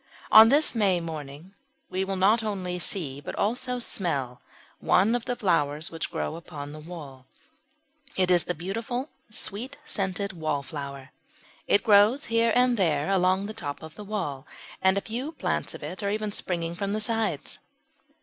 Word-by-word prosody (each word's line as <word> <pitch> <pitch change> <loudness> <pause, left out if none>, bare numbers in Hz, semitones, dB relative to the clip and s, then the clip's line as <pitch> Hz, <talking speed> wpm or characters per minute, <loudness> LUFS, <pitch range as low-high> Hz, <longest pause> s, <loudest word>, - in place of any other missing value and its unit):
On 220 +1 +10
this 295 +4 +4
May 200 -6 +3
morning 160 +1 -7 0.3
we 185 +1 -1
not 195 +4 +3
only 185 -4 -3
see, 150 -6 -1
but - - -6
also 250 +4 -1
smell, 140 - -1 0.4
one 200 +5 +3
of 245 -1 -1
the 245 - -1
flowers 165 -8 0
which 165 - -4
grow - - -3
upon 150 -4 -8
the 155 - -9
wall 150 -6 -10 0.9
it 185 -1 +3
is 175 -2 +5
the 180 - -2
beautiful 230 - -3 0.2
sweet 230 +5 -4
scented 200 -5 -2
Wallflower. 140 -4 -4 0.6
It 205 - +4
grows 215 +5 +5
here 230 0 +4
and 250 -1 +4
there 160 -3 +1
along 190 +1 +3
the 215 - -5
top 145 -8 -6
of 160 0 -9
the 210 - -9
wall, 175 -10 -4 0.3
and 190 +1 +4
a - - +1
few 250 +9 -4
plants - - -2
of - - -10
it 185 - -5
are 200 - 0
even 210 0 -1
springing 170 -4 -2
from 200 +3 -2
the 215 - -1
sides. 215 -8 -1
190 Hz, 165 wpm, -27 LUFS, 160-215 Hz, 0.9 s, On